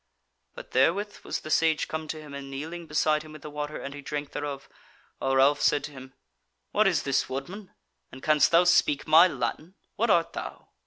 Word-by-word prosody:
But - - -11
therewith 190 +11 +1
was - - -4
the 155 - -7
Sage 160 -1 +2
come 160 0 -5
to 155 - -5
him 150 -2 -11
and 140 -1 -7
kneeling 160 +5 -6
beside 155 0 +1
him 155 0 -12
with 155 - -12
the 150 - -8
water, 150 +1 -5
and 140 - -7
he 145 - -8
drank 145 0 -5
thereof, 145 -2 -5 0.5
while 135 0 0
Ralph 140 +2 +4
said 145 - +2
to 150 - -6
him: 130 -1 -12 0.6
"What 215 0 +3
is 180 -4 +1
this 140 -1 0
woodman? 180 +10 -7 0.4
and 130 - -12
canst 150 -2 +4
thou 170 +1 +5
speak 150 -5 +3
my 160 +3 +7
Latin? 150 +5 -4 0.2
What 230 +2 +1
art 170 -3 +3
thou?" - - -7
150 Hz, 205 wpm, -27 LUFS, 140-165 Hz, 0.6 s, my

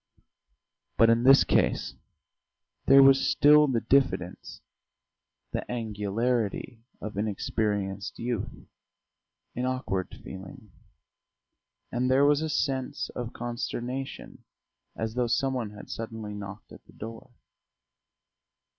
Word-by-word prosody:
But 115 0 +6
in 115 +1 +2
this 135 +1 +8
case - - +1 0.9
there 135 0 +8
was 135 0 +6
still 150 +1 +6
the 120 -4 0
diffidence, 130 -10 0 0.9
the - - -2
angularity 115 +1 -2 0.2
of 105 -2 -7
inexperienced 100 -1 -2
youth, 120 -3 -4 0.9
an 125 +1 -1
awkward 115 -8 -3
feeling; 95 +2 -10 1.2
and 125 +1 0
there 135 +2 +5
was 145 +1 +4
a 160 - -2
sense 135 -1 -1
of 120 -1 -6
consternation 120 +2 -5 0.5
as 110 0 -3
though 125 0 0
some 135 +3 +1
one 120 -5 -2
had 105 0 -11
suddenly 110 -2 -6
knocked 100 0 -9
at - - -13
the - - -19
door. 115 +4 -9
115 Hz, 110 wpm, -27 LUFS, 105-130 Hz, 1.2 s, this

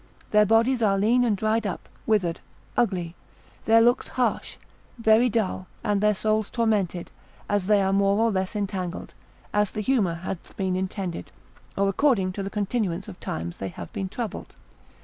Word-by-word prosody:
Their 210 -1 +5
bodies 230 +3 +3
are 200 -3 +3
lean 230 +5 +3
and 220 -4 +1
dried 220 +1 +1
up, 185 - -5 0.2
withered, 190 -7 +1 0.4
ugly, 180 -8 0 0.5
their 225 +1 +6
looks 245 +2 +3
harsh, 250 -1 -1 0.4
very 230 +2 +4
dull, 200 -4 -1 0.2
and 205 -1 +1
their 210 0 +3
souls 215 +1 0
tormented, 205 -7 0 0.4
as 205 -3 0
they 205 -2 +4
are 190 0 +1
more 200 0 +3
or 225 +1 +3
less 190 +1 -2
entangled, 190 -3 -3 0.4
as 210 -1 +2
the 215 - -4
humour 210 -8 +1
hath 175 +1 -7
been 190 -2 0
intended, 185 -1 -4 0.5
or 200 0 +2
according 195 -3 +2
to 200 - -5
the 195 - -3
continuance 200 -3 -2
of 185 -3 -10
time 85 +2 -4
they 95 - -3
have 85 -1 -9
been 190 -1 -3
troubled. 225 +1 -6
205 Hz, 170 wpm, -25 LUFS, 185-220 Hz, 0.5 s, their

